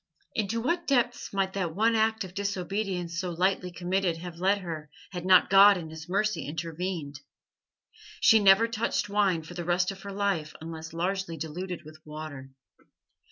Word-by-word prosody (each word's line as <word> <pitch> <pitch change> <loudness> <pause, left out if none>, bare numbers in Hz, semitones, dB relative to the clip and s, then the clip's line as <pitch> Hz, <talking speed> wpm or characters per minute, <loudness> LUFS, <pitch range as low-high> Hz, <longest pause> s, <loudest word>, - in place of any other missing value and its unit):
Into 220 +1 -1
what 340 +7 -1
depths 245 -3 +1
might 195 -1 0
that 180 -5 -2
one 225 +3 +3
act 220 -1 +2
of 185 -2 -9
disobedience 190 -3 -2
so 185 -1 -2
lightly 180 +1 0
committed 180 -1 -1
have 170 0 -8
led 195 +3 +3
her 160 -4 -6 0.2
had 180 -1 -5
not 185 0 +6
God 200 +1 +8
in 160 -3 -7
His 160 +2 -9
mercy 200 -3 0
intervened? 165 -1 -4 1.0
She 220 - +6
never 200 +2 +6
touched 225 -2 -1
wine 200 -5 +2
for 160 - -10
the 175 0 -5
rest 180 +2 +1
of 195 - -10
her 200 - -7
life 195 -6 -1
unless 160 0 -7
largely 175 0 -2
diluted 175 +4 -5
with 155 0 -13
water. 150 -3 -8
185 Hz, 165 wpm, -28 LUFS, 165-200 Hz, 1.0 s, God